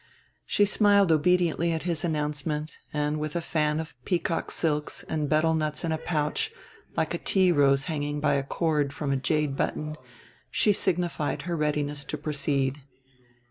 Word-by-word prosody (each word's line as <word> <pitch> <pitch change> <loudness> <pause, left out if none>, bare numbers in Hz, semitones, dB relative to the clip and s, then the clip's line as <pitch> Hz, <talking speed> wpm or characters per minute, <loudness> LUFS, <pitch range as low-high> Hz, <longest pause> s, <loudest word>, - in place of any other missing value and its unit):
She 205 - +4
smiled 200 -3 +4
obediently 170 +1 +3
at 160 -1 -2
his 170 -3 -1
announcement, 150 -1 -2
and, 150 0 -1
with 150 0 -4
a - - +2
fan 155 -2 0
of 160 0 -5
peacock 170 -2 -1
silks 150 -2 -1
and 150 -2 -2
betel 160 +1 +3
nuts 155 0 -1
in 165 - -1
a 160 - -1
pouch 160 - -1 0.5
like - - 0
a - - -2
tea 185 -2 +3
rose 140 -3 +4
hanging 145 -1 -2
by 145 -1 +2
a 140 - +2
cord 150 -1 0
from 145 -1 -2
a - - +2
jade 140 +1 0
button, 155 +2 -2 0.5
she 210 - +3
signified 175 -5 -1
her 175 -1 -2
readiness 150 -2 0
to - - -4
proceed. 140 -2 -1
155 Hz, 165 wpm, -27 LUFS, 145-170 Hz, 0.5 s, She